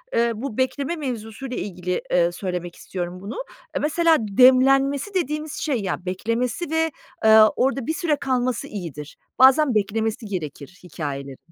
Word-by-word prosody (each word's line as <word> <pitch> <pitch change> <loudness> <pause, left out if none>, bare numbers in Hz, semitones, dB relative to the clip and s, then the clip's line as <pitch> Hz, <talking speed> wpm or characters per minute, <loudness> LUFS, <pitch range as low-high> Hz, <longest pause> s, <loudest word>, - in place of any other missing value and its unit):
eee, 235 0 +3
bu 235 0 -5
bekleme 275 +5 -1
mevzusuyla 250 -2 -5
ilgili, 180 -2 -3
eee, 175 -1 +3
söylemek 180 -1 -5
istiyorum 180 0 -6
bunu. 200 - -6 0.4
Eee, - - 0
mesela 325 +2 +3
demlenmesi 265 - +4
dediğimiz 305 -4 -2
şey, 265 -8 -1
ya 185 -1 -3
beklemesi 230 - -2
ve, 320 0 +1 0.3
eee, 220 0 +8 0.2
orada 270 0 0
bir 315 - 0
süre 325 -3 0
kalması 255 -4 -1
iyidir. 160 -7 -7 0.2
Bazen 265 0 +6
beklemesi 220 +2 -1
gerekir 180 -3 -6
hikâyelerin. 140 -5 -6
230 Hz, 140 wpm, -23 LUFS, 185-275 Hz, 0.4 s, eee